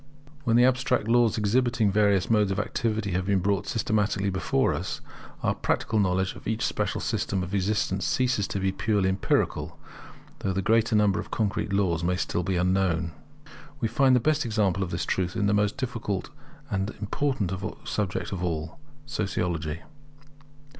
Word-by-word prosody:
When 115 - +3
the 120 +1 +6
abstract 130 -4 +1
laws 115 -1 +3
exhibiting 115 +1 +2
the - - -3
various 100 -3 +3
modes 105 -3 +3
of 95 +1 -1
activity 105 -1 -1
have 90 +1 -1
been 100 -1 +3
brought 100 +1 0
systematically 105 -3 0
before 90 -7 +1
us, - - -4 0.4
our - - +2
practical 110 - 0
knowledge 95 -1 +1
of - - -10
each 110 +1 0
special - - -1
system 95 -2 -1
of 90 +2 -6
existence 100 -1 0
ceases 125 -6 +1
to 100 - -3
be 95 0 +1
purely 100 -1 +1
empirical, 95 +1 0 0.6
though 95 - -1
the 95 - 0
greater 115 +1 +3
number 105 -2 +3
of - - -6
concrete 105 -2 -1
laws 90 -4 +1
may 90 +1 +1
still 90 0 -1
be 95 +1 -1
unknown. 90 -2 +1 0.7
We 115 - +1
find 135 +1 +4
the - - +5
best 155 +4 +1
example 105 -5 +1
of 95 - -1
this 85 0 -2
truth 90 0 -1
in 105 -2 +1
the 100 - +2
most 105 -1 +1
difficult 115 -8 -3 0.4
and 95 +1 0
important 110 -2 -1 0.4
subject 100 -3 -2
of 90 -3 -3
all, 80 - -3 0.3
Sociology. 85 - -2
100 Hz, 170 wpm, -26 LUFS, 95-110 Hz, 0.7 s, the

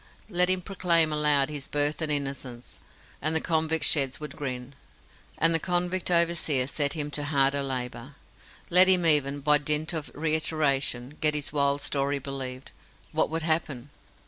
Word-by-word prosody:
Let 180 -2 +2
him 185 -1 0
proclaim 170 -5 0
aloud 150 -2 +2
his 145 -2 -5
birth 145 +2 0
and 155 -1 0
innocence, 135 -4 -4 0.4
and 155 +2 0
the - - +3
convict 160 0 0
sheds 135 -3 +2
would 150 -3 -8
grin, 130 -2 -6 0.6
and 165 +1 +4
the 165 - +2
convict 180 +1 -2
overseer 170 -6 +1
set 145 +1 0
him 150 -2 -3
to 145 0 -2
harder 140 -1 +1
labour. 130 -3 -5 0.6
Let 180 +2 +9
him 180 -2 +4
even, 145 -3 +3
by 150 +1 +4
dint 150 +3 -2
of 160 -3 -5
reiteration, 150 -4 -1
get 150 -1 +3
his 145 -1 -3
wild 140 -1 +1
story 140 0 -1
believed, 135 -1 -6 0.4
what - - 0
would 160 +1 -4
happen? 150 -5 -2
150 Hz, 160 wpm, -26 LUFS, 140-160 Hz, 0.6 s, Let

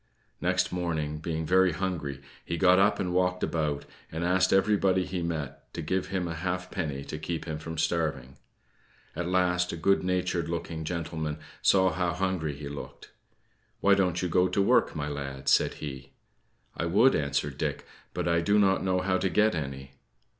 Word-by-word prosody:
Next - - +1
morning, 80 -4 -2
being 80 0 -3
very 95 +1 +4
hungry, 75 -7 -3 0.2
he 85 - -3
got 95 0 +5
up 100 +2 +3
and 90 -1 -1
walked 90 0 +1
about, 75 -3 -1 0.3
and 80 +2 -3
asked 90 +2 +3
everybody 95 -2 +3
he 90 -1 -3
met 80 -5 -4
to 85 - -4
give 95 +4 -1
him 95 -2 -2
a 85 - -3
halfpenny 90 -4 -3
to 75 - -6
keep 80 +1 -4
him 80 -2 -4
from 80 +1 -6
starving. 75 -6 -1 0.8
At 85 +1 -2
last, 90 -1 +2
a 85 - -5
good 100 +4 +3
natured 90 -2 0
looking 85 -1 -4
gentleman 80 -2 -3 0.2
saw 95 -1 +4
how 90 -1 0
hungry 90 -5 -1
he 70 0 -7
looked. 70 0 -9 0.7
"Why 100 - +5
don't 90 -2 +1
you - - +1
go 90 +2 +3
to 100 - -1
work, 100 - +3
my 75 -1 -2
lad?" 70 -2 -5
said - - +4
he. 70 -2 -8 0.6
"I 85 - -2
would," 115 +10 +5
answered 70 -2 -1
Dick, - - -2 0.3
"but - - -1
I 85 0 +3
do 100 +5 +3
not 95 -2 +3
know 90 -1 +1
how 95 0 +1
to 95 - +1
get 105 +3 +3
any." 70 -4 -5
85 Hz, 180 wpm, -28 LUFS, 75-95 Hz, 0.8 s, got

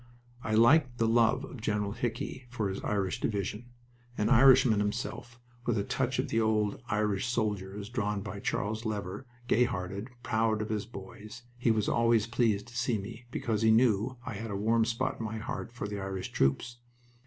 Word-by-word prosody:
I 110 - 0
liked 120 +2 +5
the 115 - +2
love 120 +4 +3
of 130 -3 -10
General 105 -2 -1
Hickey 120 +3 -4
for 110 -4 -2
his 95 - -5
Irish 100 -3 -1
division. 105 +2 -2 0.5
An 105 - +1
Irishman 130 -3 +6
himself, 120 +3 -3 0.3
with 120 -2 +2
a 100 - +1
touch 130 +4 -1
of - - -1
the 115 - +2
old 105 -1 +1
Irish 105 0 0
soldier 105 -5 -1
as 100 -1 -6
drawn 105 -4 -2
by 105 -1 -6
Charles 105 +3 -2
Lever, 105 +1 -4 0.2
gay 125 +1 +4
hearted, 100 +1 -4
proud 110 -1 +1
of 110 - -6
his 110 -1 -2
boys, 105 +2 -10
he 120 -1 0
was 110 -2 +2
always 115 -2 +3
pleased 115 -3 +1
to 120 - -14
see 120 -1 +1
me 115 +4 -8
because 115 -3 -2
he 110 - +4
knew 115 +1 +3
I 130 - -4
had 110 +3 -5
a 100 - -3
warm 110 +3 +2
spot 115 0 -2
in 115 - -3
my 110 0 -4
heart 120 +1 -5
for 120 -4 -5
the 105 0 -4
Irish 95 -1 -4
troops. 70 - 0
110 Hz, 190 wpm, -30 LUFS, 105-120 Hz, 0.5 s, Irishman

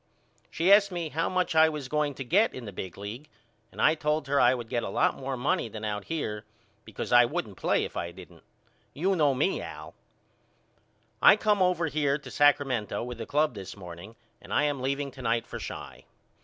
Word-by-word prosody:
She 175 +4 +1
asked 200 -1 +5
me 170 -3 -3
how 165 +3 -1
much 185 -2 0
I 160 0 +6
was 150 -4 -5
going 150 0 -1
to 135 - -5
get 195 - +2
in 130 - -7
the 105 - -7
big 90 -1 -7
league 110 +9 -8 0.4
and - - -13
I 155 - +5
told 150 -1 -1
her 140 +1 +2
I 130 - +5
would 120 -2 -6
get 120 0 -1
a - - -4
lot - - +2
more 135 -1 -4
money 140 0 0
than 110 0 -7
out 105 -1 -3
here 110 -10 -3 0.4
because - - -6
I 120 0 +7
wouldn't 110 -4 -4
play - - +1
if - - -9
I 85 - -3
didn't. 90 -1 -14 0.5
You 190 +6 +1
know 145 -5 +3
me 150 +9 0
Al. - - -9 1.3
I - - +8
come 210 -2 +1
over 180 -2 +2
here 145 -3 0
to 150 - -12
Sacramento 135 -8 +2
with 120 -1 -7
the 115 - -6
club 150 -1 +1
this 100 -2 -8
morning 90 +3 -10 0.3
and - - -13
I - - +2
am 145 -3 -1
leaving 140 +1 -2
to 130 - -11
night 115 -1 0
for - - -7
Chi. - - -8
140 Hz, 210 wpm, -28 LUFS, 115-155 Hz, 1.3 s, I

